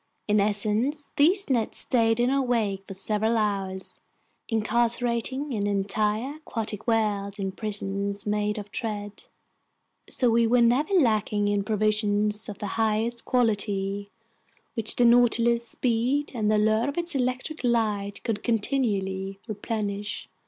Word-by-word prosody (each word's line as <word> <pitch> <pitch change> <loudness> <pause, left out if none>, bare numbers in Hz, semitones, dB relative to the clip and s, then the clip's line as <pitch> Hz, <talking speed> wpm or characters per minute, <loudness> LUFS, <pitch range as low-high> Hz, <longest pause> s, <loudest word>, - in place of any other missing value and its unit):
In 210 0 +3
essence, 215 +8 +1
these 370 +7 +3
nets 240 -6 0
stayed 225 -2 +2
in 245 +2 +2
our 275 0 +2
wake 215 -6 -1
for 195 - -8
several 215 +4 0
hours, 195 -3 -2 0.5
incarcerating 235 +4 0
an 205 -2 -1
entire 210 +7 -1
aquatic 225 -7 -5
world 205 -3 0
in 195 -1 -2
prisons 200 -1 -1
made 210 0 -1
of 205 -1 -7
thread. 205 -2 -5 0.8
So 245 -3 +1
we 230 0 +3
were 245 +2 +3
never 255 +9 +2
lacking 215 - +2
in 205 -1 0
provisions 210 0 0
of 205 - -7
the 205 - -5 0.2
highest 225 +2 0
quality, 205 -4 0 0.6
which 225 -3 +1
the 245 - +3
Nautilus's 235 0 +4
speed 250 +5 0
and 215 -4 0
the - - +3
allure 220 +4 +2
of 285 - -6
its 345 0 +5
electric 260 +3 -2
light 215 -4 0
could 215 -3 -2
continually 200 -5 -1
replenish. 210 -1 -4
220 Hz, 135 wpm, -26 LUFS, 205-240 Hz, 0.8 s, its